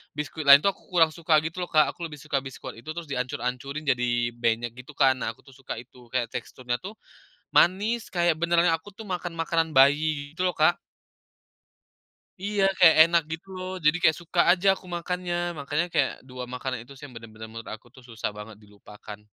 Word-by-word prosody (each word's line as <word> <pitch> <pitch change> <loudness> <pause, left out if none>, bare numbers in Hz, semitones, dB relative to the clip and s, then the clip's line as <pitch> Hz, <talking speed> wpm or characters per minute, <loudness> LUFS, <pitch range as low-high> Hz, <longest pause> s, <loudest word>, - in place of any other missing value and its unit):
biskuit 150 +1 -5
lain 140 +1 +9
tuh, 200 - +4
kurang 170 -4 +1
suka, 160 0 +1
gitu 165 +3 -5
loh 180 - -3
Kak, 155 -3 +3
aku 170 -1 -6
lebih 155 - -10
suka 145 -1 -2
Biskuat 130 -3 -9
itu, 120 - -19
terus 170 -4 -7
dihancur-hancurin, 125 +2 -3
jadi 120 -3 0
benyek 120 0 -1
gitu 130 +3 -12
kan. 130 -2 +3
Nah, 115 -2 -3
aku - - -25
tuh - - -17
suka 135 0 -7
itu, 120 +1 -13
kayak, 120 -1 -2
teksturnya 125 -1 -4
tuh, 200 +4 -9 0.6
manis, 210 +6 +2
kayak, 175 -2 +2
benerannya, 170 +1 +2
aku 165 +5 -6
tuh 210 +2 -11
makan, 175 -3 -4
makanan 165 0 0
bayi, 145 +1 +3
gitu 180 - -3
loh 180 -1 0
Kak. 155 +3 +5 1.7
Iya, 200 +1 -1 0.2
kayak, 170 -3 +8
enak 170 +1 +3
gitu 165 +4 -6
loh. 185 0 -5
Jadi, 155 +3 +4
kayak, 160 -3 +4
suka 175 +1 -3
aja 185 +2 +1
aku - - -16
makannya, 180 0 -3 0.2
makanya 145 +4 -1
kayak 150 -5 +2 0.2
2 125 0 -7
makanan 125 -1 -4
itu 135 - -17
sih, 140 - -15
yang 135 - -13
benar-benar 110 -1 -10
menurut 115 0 -9
aku 115 +3 -20
tuh, 130 - -15
susah 115 -2 -3
banget 105 +1 -9
dilupakan. 105 +1 -12
150 Hz, 195 wpm, -26 LUFS, 125-170 Hz, 1.7 s, lain